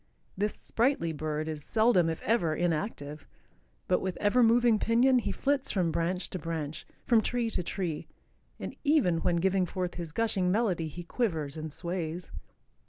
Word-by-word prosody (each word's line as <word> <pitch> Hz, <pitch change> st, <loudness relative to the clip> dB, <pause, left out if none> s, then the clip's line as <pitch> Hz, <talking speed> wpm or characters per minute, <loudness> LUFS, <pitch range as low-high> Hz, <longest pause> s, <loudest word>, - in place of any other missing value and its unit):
This 205 Hz, +2 st, -1 dB
sprightly 235 Hz, -, 0 dB
bird 155 Hz, 0 st, -3 dB
is 155 Hz, -2 st, -5 dB
seldom, 220 Hz, -4 st, +3 dB
if 160 Hz, -, -4 dB
ever, 175 Hz, -8 st, +2 dB
inactive, 155 Hz, -4 st, -2 dB, 0.6 s
but 180 Hz, -, +2 dB
with 185 Hz, -1 st, -3 dB
ever 210 Hz, +5 st, +3 dB
moving 235 Hz, -1 st, +5 dB
pinion 245 Hz, +4 st, +4 dB
he 205 Hz, -4 st, -2 dB
flits 275 Hz, +6 st, 0 dB
from 180 Hz, -4 st, +1 dB
branch 175 Hz, +3 st, -1 dB
to 185 Hz, -, -3 dB
branch, 160 Hz, -2 st, -4 dB, 0.2 s
from 230 Hz, -3 st, +4 dB
tree 235 Hz, 0 st, -1 dB
to -, -, +1 dB
tree, 175 Hz, -3 st, -3 dB, 0.5 s
and -, -, -6 dB
even 280 Hz, -, +3 dB
when 170 Hz, -, +1 dB
giving 185 Hz, +1 st, +2 dB
forth 180 Hz, 0 st, -3 dB
his 170 Hz, -3 st, -6 dB
gushing 195 Hz, -2 st, +1 dB
melody 185 Hz, -6 st, +1 dB
he 175 Hz, +3 st, -7 dB
quivers 165 Hz, -, -2 dB
and 155 Hz, -1 st, -5 dB
sways. 170 Hz, +1 st, -4 dB
180 Hz, 165 wpm, -29 LUFS, 165-225 Hz, 0.6 s, moving